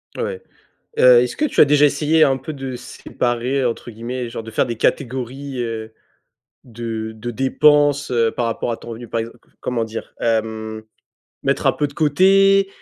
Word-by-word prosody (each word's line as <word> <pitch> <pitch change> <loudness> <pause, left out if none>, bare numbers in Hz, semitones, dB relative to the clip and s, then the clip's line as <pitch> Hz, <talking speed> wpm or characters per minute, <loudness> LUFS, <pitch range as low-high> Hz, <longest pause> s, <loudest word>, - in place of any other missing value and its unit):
Ouais, 465 -1 -4 0.6
heu, - - +7
est-ce - - -3
que 305 - 0
tu 300 - +1
as - - +10
déjà 150 0 +4
essayé 155 +3 +3
un 135 -2 +2
peu 135 +4 -7
de 135 -3 -6
«séparer» 125 +2 -2
entre 120 0 -3
guillemets, 120 +2 -5
genre 115 -1 -6
de 110 - -9
faire 110 - +1
des 115 - -4
catégories, 130 +2 -2
heu, 110 -1 -5 0.7
de 115 -2 -5
de 110 +2 -6
dépenses, 145 +3 +3
heu, 115 -2 +2
par 120 - -2
rapport 115 +1 -2
à 115 - -3
ton - - -11
revenu 115 +1 -8
par 115 - -2
exemp 115 +1 -5
co - - -32
comment 120 -2 -2
dire? 110 0 -7
Hem, 110 -1 -2 0.6
mettre - - 0
un - - +5
peu 145 - -1
de 140 - -13
côté, 195 +6 +4
125 Hz, 185 wpm, -20 LUFS, 115-145 Hz, 0.7 s, as